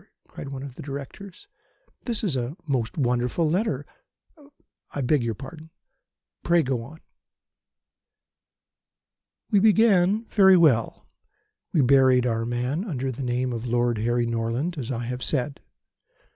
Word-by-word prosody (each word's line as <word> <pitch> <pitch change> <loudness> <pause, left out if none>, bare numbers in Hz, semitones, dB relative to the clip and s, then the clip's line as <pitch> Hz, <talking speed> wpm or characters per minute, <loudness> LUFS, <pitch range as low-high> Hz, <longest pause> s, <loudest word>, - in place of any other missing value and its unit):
cried 140 - -9
one 135 -1 -6
of 140 -3 -8
the - - -10
Directors, 145 +7 -9 0.6
"this 230 -4 -2
is 180 -10 0
a 125 +6 -3
most 125 -3 -2
wonderful 125 +4 0
letter. 155 - -1 1.1
I 145 - -1
beg 140 +2 +2
your 115 -2 -2
pardon. 155 +6 -10 0.7
Pray 170 -1 +3
go 130 -2 -1
on." 155 +8 -12 2.5
"We 205 - +5
began 210 -1 +4
very 190 -4 +5
well. 135 -10 +2 0.7
We 155 - +3
buried 130 -1 +4
our 115 -1 -1
man 125 +8 -2
under 135 - -3
the 130 - -7
name 125 0 -1
of 115 +1 -5
Lord 120 -1 +1
Harry 120 +2 +1
Norland, 115 +8 -2
as 120 - -5
I 120 -2 -3
have 125 +1 -5
said. 140 0 -1
135 Hz, 135 wpm, -25 LUFS, 120-165 Hz, 2.5 s, We